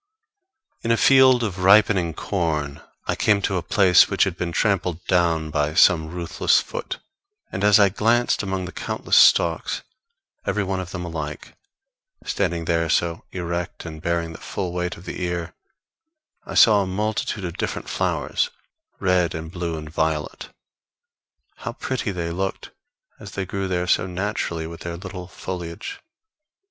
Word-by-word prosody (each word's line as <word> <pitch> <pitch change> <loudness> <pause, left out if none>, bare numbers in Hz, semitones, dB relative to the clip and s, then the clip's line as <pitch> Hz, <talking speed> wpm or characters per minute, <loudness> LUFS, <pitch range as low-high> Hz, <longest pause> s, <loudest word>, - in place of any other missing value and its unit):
In 115 - -3
a 115 - +4
field 130 -2 +6
of 100 -4 -3
ripening 95 -3 +4
corn 75 -8 -2 0.2
I - - 0
came 105 -1 +3
to 95 - 0
a - - -1
place 90 0 +5
which - - +3
had - - -1
been 85 -1 -3
trampled 90 -2 0
down 85 -4 +1
by 75 0 0
some 80 -3 +5
ruthless 85 0 +1
foot; - - -5 0.5
and 95 - -3
as 105 0 +6
I 100 -1 +6
glanced 115 +5 +2
amongst 95 -2 -3
the 90 - -7
countless - - -1
stalks, - - +4 0.6
every 100 +1 0
one 95 -1 -2
of 90 -1 -5
them 90 -2 -5
alike, 75 -3 -6 0.7
standing 85 -2 -1
there 85 0 +1
so 85 +1 0
erect 85 -1 -4
and 80 -2 -8
bearing 85 -1 -1
the - - -11
full 90 -2 -4
weight 90 0 -2
of 85 - -14
the - - -6
ear, 85 -1 -3 0.9
I - - -6
saw 105 -3 +7
a 95 - -2
multitude 105 +1 -2
of 85 +1 -6
different - - -3
flowers, 485 - -1 0.5
red 90 -3 +2
and 80 0 -6
blue 85 -3 -3
and 75 0 -7
violet. 80 -1 -2 1.1
How - - -5
pretty 130 -5 -3
they 85 -3 -3
looked 95 +3 -4 0.5
as - - -10
they 100 - -3
grew 95 +1 -3
there 90 -1 -1
so 90 - +2
naturally 90 -3 -3
with 85 +1 -8
their 85 0 -5
little 90 0 -8
foliage! 90 -2 -6
90 Hz, 160 wpm, -23 LUFS, 85-95 Hz, 1.1 s, saw